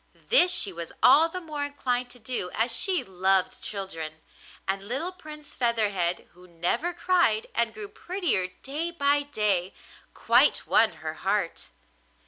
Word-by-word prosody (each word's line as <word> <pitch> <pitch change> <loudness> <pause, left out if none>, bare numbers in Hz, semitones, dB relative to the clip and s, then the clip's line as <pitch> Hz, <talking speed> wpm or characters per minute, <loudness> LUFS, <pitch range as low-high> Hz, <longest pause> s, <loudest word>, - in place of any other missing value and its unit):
This 365 -7 +5
she 195 - +3
was 170 -1 -7
all 300 +6 +7
the 365 - -5
more 305 -4 -4
inclined 250 -4 -1
to 245 - -12
do 225 -5 -3
as 230 +1 +1
she 370 +8 +2
loved 190 0 +1
children, 175 -6 -5 0.5
and 195 0 -1
little 275 - -1
Prince 305 -5 -11
Featherhead, 205 -8 0
who 180 +1 -18
never 180 - -1
cried 345 -11 +2
and 235 0 0
grew 215 -2 -6
prettier 345 - -2 0.2
day 300 +5 -3
by 290 -3 +2
day, 210 -10 -1 0.4
quite - - +3
won - - +3
her - - -2
heart. - - -2
240 Hz, 145 wpm, -26 LUFS, 190-305 Hz, 0.5 s, all